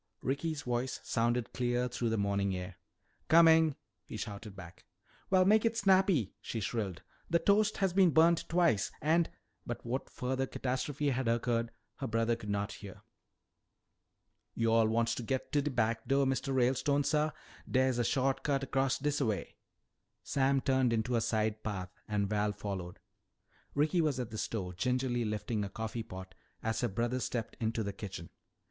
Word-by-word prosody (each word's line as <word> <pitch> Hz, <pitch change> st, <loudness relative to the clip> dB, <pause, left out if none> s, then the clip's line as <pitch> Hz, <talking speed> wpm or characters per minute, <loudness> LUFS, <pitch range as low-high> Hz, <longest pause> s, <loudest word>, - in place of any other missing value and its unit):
Ricky's 145 Hz, +2 st, -2 dB
voice 125 Hz, +1 st, -2 dB
sounded 120 Hz, 0 st, 0 dB
clear 125 Hz, 0 st, 0 dB
through 120 Hz, -1 st, -2 dB
the 110 Hz, -, 0 dB
morning 100 Hz, -1 st, 0 dB
air. 90 Hz, 0 st, -7 dB, 0.5 s
"Coming!" 160 Hz, -2 st, +6 dB, 0.3 s
he -, -, -8 dB
shouted 100 Hz, 0 st, -6 dB
back. 85 Hz, -2 st, -11 dB, 0.5 s
"Well, 185 Hz, -1 st, +5 dB
make 210 Hz, +2 st, +5 dB
it 230 Hz, 0 st, +1 dB
snappy!" 190 Hz, -, +3 dB
she 115 Hz, -, -4 dB
shrilled. 100 Hz, -4 st, -3 dB, 0.3 s
"The 170 Hz, -, +4 dB
toast 210 Hz, +4 st, +3 dB
has 190 Hz, -3 st, +1 dB
been 190 Hz, -2 st, +5 dB
burnt 165 Hz, +2 st, +4 dB
twice 170 Hz, -, +2 dB
and 160 Hz, +2 st, +2 dB, 0.2 s
" -, -, -45 dB
But -, -, -5 dB
what 125 Hz, +3 st, -3 dB
further 130 Hz, +1 st, -2 dB
catastrophe 140 Hz, +3 st, -1 dB
had 130 Hz, -1 st, -1 dB
occurred 115 Hz, 0 st, +1 dB, 0.3 s
her -, -, -3 dB
brother 115 Hz, +1 st, +1 dB
could 110 Hz, -3 st, -8 dB
not 100 Hz, 0 st, -1 dB
hear. 100 Hz, -3 st, -10 dB, 1.5 s
"Yo'all 115 Hz, -1 st, +3 dB
wants 115 Hz, +1 st, +1 dB
to -, -, -4 dB
git 130 Hz, +3 st, -3 dB
to 145 Hz, -, +3 dB
de 150 Hz, -, -1 dB
back 115 Hz, -3 st, 0 dB
do', 135 Hz, 0 st, +3 dB
Mistuh 135 Hz, +1 st, -1 dB
Ralestone, 135 Hz, +3 st, +2 dB
suh? 150 Hz, +1 st, +2 dB, 0.4 s
Dere's 130 Hz, -1 st, +2 dB
a -, -, +3 dB
sho't 135 Hz, +2 st, +1 dB
cut 135 Hz, -2 st, -1 dB
'cross 135 Hz, -1 st, +2 dB
dis 145 Hz, +1 st, -1 dB
a 130 Hz, -, +2 dB
way." 105 Hz, -3 st, -3 dB, 0.7 s
Sam 135 Hz, -1 st, +2 dB
turned 130 Hz, -3 st, +2 dB
into 115 Hz, +2 st, 0 dB
a 115 Hz, -, +2 dB
side 110 Hz, -1 st, 0 dB
path 95 Hz, -4 st, -4 dB, 0.2 s
and 105 Hz, -1 st, 0 dB
Val 105 Hz, 0 st, 0 dB
followed. 95 Hz, -3 st, -5 dB, 0.8 s
Ricky 155 Hz, +5 st, +2 dB
was 150 Hz, -5 st, 0 dB
at 120 Hz, -2 st, -4 dB
the 110 Hz, -, -5 dB
stove 90 Hz, -6 st, -3 dB
gingerly 125 Hz, +1 st, 0 dB
shifting 105 Hz, 0 st, -2 dB
a 100 Hz, -, -4 dB
coffee 110 Hz, +3 st, -4 dB
pot 95 Hz, -3 st, -9 dB, 0.3 s
as 115 Hz, 0 st, -1 dB
her 120 Hz, -, +2 dB
brother 120 Hz, +4 st, -1 dB
stepped 120 Hz, -3 st, -3 dB
into 115 Hz, -1 st, -1 dB
the 100 Hz, -1 st, -4 dB
kitchen. 95 Hz, -4 st, -7 dB
120 Hz, 170 wpm, -32 LUFS, 110-140 Hz, 1.5 s, Coming